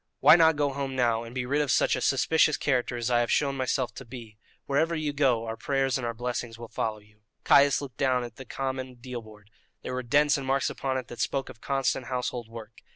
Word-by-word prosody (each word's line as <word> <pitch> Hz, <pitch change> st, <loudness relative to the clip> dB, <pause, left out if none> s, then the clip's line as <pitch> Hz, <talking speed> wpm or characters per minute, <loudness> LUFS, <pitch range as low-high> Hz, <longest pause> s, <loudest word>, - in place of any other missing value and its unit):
Why -, -, +8 dB
not 160 Hz, -2 st, +5 dB
go 145 Hz, -1 st, 0 dB
home 135 Hz, -1 st, -4 dB
now, 120 Hz, -3 st, +2 dB
and 115 Hz, +2 st, -10 dB
be 125 Hz, -1 st, -2 dB
rid 145 Hz, +4 st, +1 dB
of 145 Hz, -, -1 dB
such -, -, +3 dB
a 125 Hz, -, -4 dB
suspicious 150 Hz, +4 st, +3 dB
character 125 Hz, -3 st, 0 dB
as 120 Hz, +1 st, -2 dB
I 120 Hz, -, +4 dB
have 120 Hz, -1 st, 0 dB
shown 140 Hz, -2 st, +1 dB
myself 130 Hz, -1 st, -1 dB
to -, -, -9 dB
be? 115 Hz, -3 st, -11 dB, 0.3 s
Wherever 160 Hz, +4 st, +1 dB
you 155 Hz, -2 st, -2 dB
go, 130 Hz, -6 st, +2 dB
our 115 Hz, 0 st, -4 dB
prayers 135 Hz, +2 st, 0 dB
and 130 Hz, -3 st, -2 dB
our 115 Hz, -, -2 dB
blessings 120 Hz, -1 st, -4 dB
will 115 Hz, -1 st, -9 dB
follow 110 Hz, -1 st, -2 dB
you." 105 Hz, 0 st, -22 dB, 0.2 s
Caius 140 Hz, 0 st, +5 dB
looked 130 Hz, -6 st, -8 dB
down 130 Hz, -2 st, +1 dB
at 120 Hz, -2 st, -9 dB
the 130 Hz, -, -9 dB
common 130 Hz, 0 st, -4 dB
deal 120 Hz, 0 st, -7 dB
board. 105 Hz, -2 st, -16 dB, 0.3 s
There -, -, -5 dB
were 130 Hz, -, -2 dB
dents 145 Hz, +4 st, +3 dB
and 135 Hz, -, -6 dB
marks 135 Hz, 0 st, +1 dB
upon 130 Hz, -1 st, -2 dB
it 130 Hz, -, -5 dB
that 120 Hz, -, -9 dB
spoke 135 Hz, -2 st, -1 dB
of 110 Hz, -, -13 dB
constant 135 Hz, -2 st, -1 dB
household 125 Hz, -2 st, -3 dB
work. 115 Hz, -1 st, -11 dB
130 Hz, 240 wpm, -27 LUFS, 120-140 Hz, 0.3 s, Why